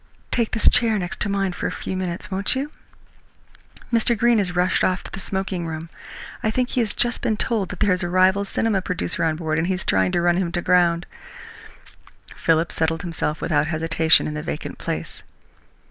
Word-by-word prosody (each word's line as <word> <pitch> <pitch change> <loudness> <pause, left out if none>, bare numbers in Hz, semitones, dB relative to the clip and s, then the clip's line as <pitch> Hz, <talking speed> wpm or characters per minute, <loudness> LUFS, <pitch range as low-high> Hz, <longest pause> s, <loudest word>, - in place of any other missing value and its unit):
Take 235 -3 +1
this 225 - +1
chair 225 -3 +4
next 185 0 -3
mine 195 -2 0
for - - -3
a - - -3
few 190 - -5
minutes, 185 0 -4
won't 195 +5 +1
you? 280 +3 -3 1.2
Mr. 230 0 +3
Greene 235 0 +4
has 180 -3 -1
rushed 180 +1 +2
off 185 0 +1
to - - -9
the - - -6
smoking 190 -3 -3
room. 160 +1 -6 0.5
I 220 - +1
think 250 +3 0
he - - -1
has 225 -3 0
just 240 -1 0
been 215 - 0
told 210 -6 0
that - - -8
there 205 -2 +4
is 180 - -1
a 175 - -1
rival 185 +2 +4
cinema 200 0 0
producer 180 - -2
on 160 -1 +1
board, 155 -1 -1
and 165 - 0
he 190 - +1
is 180 - -6
trying 95 -1 +2
to - - +2
run 175 0 +3
him 180 -3 -1
to 175 - 0
ground." 175 -1 +3 1.3
Philip 165 +1 +1
settled 160 0 -1
himself 165 -2 -2
without 150 -2 +1
hesitation 160 0 +3
in 150 - -3
the 150 - -4
vacant 150 - -5
place. - - -5
180 Hz, 205 wpm, -22 LUFS, 165-200 Hz, 1.3 s, chair